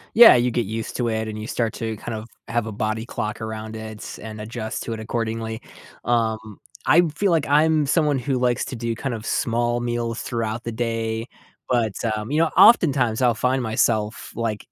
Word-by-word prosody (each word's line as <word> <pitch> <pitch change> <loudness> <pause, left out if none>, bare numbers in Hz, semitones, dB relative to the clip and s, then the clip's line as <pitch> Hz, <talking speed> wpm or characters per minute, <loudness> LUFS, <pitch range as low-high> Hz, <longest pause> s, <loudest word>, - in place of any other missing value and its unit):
Yeah, 235 - +10
you 125 0 +2
get 115 -2 -1
used 110 +1 -4
to 120 - 0
it, 110 0 -1
and 110 0 -5
you 110 - -6
start 115 -3 -1
to, 110 -1 -4
kind 115 - -6
of, 110 +1 -7 0.2
have 120 -1 -1
a - - -4
body 110 +2 -2
clock 110 -3 -4
around 110 0 -5
it 110 -1 -8
and 110 0 -8
adjust 110 0 -5
to 115 - -4
it, 110 - -6
accordingly. 110 0 -3 0.4
Um, 110 -3 0 0.3
I 165 +6 +6
feel 200 +2 +1
like 160 -3 +2
I'm 155 +1 +4
someone 150 -3 +2
who 130 +1 -1
likes 125 -1 +1
to - - -6
do, 115 -1 -2
kind 125 +2 -3
of, 110 0 -8
small 120 +1 0
meals 120 -1 -2
throughout 115 -1 -3
the 115 - -4
day, 115 0 -2 0.4
but, 115 -5 +1 0.2
um, 105 +1 -5
you 150 - 0
know, 165 -1 +3
oftentimes, 135 - +5
I'll 120 -1 +4
find 125 +3 0
myself, 110 -1 0
like, 115 -3 -3
115 Hz, 200 wpm, -23 LUFS, 110-125 Hz, 0.4 s, Yeah